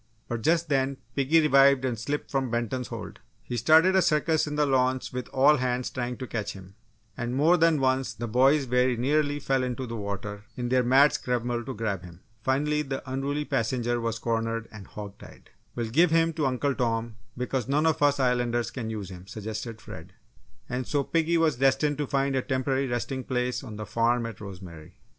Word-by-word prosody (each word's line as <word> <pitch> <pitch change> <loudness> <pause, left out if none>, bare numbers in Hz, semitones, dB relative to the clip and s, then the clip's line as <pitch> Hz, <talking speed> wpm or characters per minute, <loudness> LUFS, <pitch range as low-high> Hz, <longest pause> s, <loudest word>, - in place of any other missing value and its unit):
But 115 -1 -3
just 165 +5 +2
then, 135 -2 0 0.2
piggy 145 +4 +4
revived 140 -3 +5
and 125 -2 0
slipped 145 +5 -3
from 135 -2 0
Benton's 120 +2 -2
hold. - - -8 0.2
He 120 - -5
started 160 - +5
a 190 - +5
circus 155 -1 +2
in 150 - -3
the 150 0 +2
launch 130 -2 +1
with 125 0 -4
all 145 +3 +4
hands 125 -1 -1
trying 125 -1 -3
to 130 - -5
catch 110 -4 -4
him, 95 -1 -12 0.4
and 120 -1 -3
more 155 +6 +4
than 165 -3 +3
once, 130 0 +1
the 120 - -4
boys 135 +6 +4
very 125 -1 +1
nearly 145 +3 +1
fell 135 -2 0
into 125 0 -3
the 115 -1 -6
water 100 0 -5
in 120 -1 -3
their 130 0 +3
mad 135 +4 +5
scramble 120 -1 -2
to 135 - -5
grab 100 -4 -2
him. 90 0 -13 0.2
Finally, 150 +5 +1
the 135 -2 -5
unruly 140 +3 -2
passenger 120 0 -1
was 115 -1 -2
cornered 115 0 -2
and 105 -3 -11
"hog 100 -1 -9
tied." - - -15 0.2
"We'll 115 -2 -3
give 165 +7 +5
him 165 0 +2
to 150 -3 0
Uncle 135 +2 0
Tom, 115 -3 -2 0.2
because 125 -1 -2
none 145 +3 +1
of 160 -2 +1
us 145 -1 +3
Islanders 120 -2 +1
can 115 -4 -5
use 105 -4 -5
him," 90 +1 -11
suggested 110 +2 -6
Fred. - - -11 0.5
And 125 0 -3
so 145 -2 0
piggy 165 +3 +1
was 160 -5 +2
destined 135 +2 +2
to 145 - -1
find 135 0 0
a 130 - +2
temporary 130 +1 -1
resting 130 +2 -3
place 125 0 -2
on 115 -5 -8
the 105 0 -6
farm 115 +3 +1
at 115 -4 -7
Rosemary. 90 -5 -10
130 Hz, 200 wpm, -27 LUFS, 115-140 Hz, 0.5 s, revived